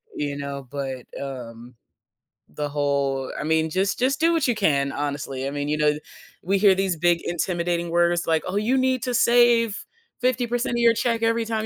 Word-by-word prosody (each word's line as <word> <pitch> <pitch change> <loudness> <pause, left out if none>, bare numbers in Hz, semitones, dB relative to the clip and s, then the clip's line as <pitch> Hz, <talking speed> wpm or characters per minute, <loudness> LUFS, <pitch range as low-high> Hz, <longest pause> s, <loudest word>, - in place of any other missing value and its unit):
You 145 -1 -3
know, 140 -2 -6
but, 135 -3 -5 0.2
um 125 -3 -8 0.8
the 150 -1 -3
whole 140 -2 -1
I - - -3
mean, 160 +1 +1
just 195 +5 0
just 270 +3 +1
do 335 +1 +3
what 320 -5 +1
you 240 - +1
can, 140 -9 +1
honestly. 140 -2 -3
I - - -3
mean, 145 0 -3
you 150 - 0
know 150 0 +3
the 150 - -8 0.4
we 195 +2 +1
hear 200 -2 +6
these 190 -2 0
big 170 +1 +2
intimidating 170 0 -1
words 175 0 +2
like, 160 -1 +2
"Oh, 185 - -3
you 230 +5 +1
need 260 -2 +1
to 250 -1 -2
save 235 -2 +4 0.4
50% 245 -1 0
of - - 0
your 230 -1 +5
check 230 -1 0
every 230 0 +1
time 220 -1 -2
170 Hz, 195 wpm, -23 LUFS, 145-230 Hz, 0.8 s, hear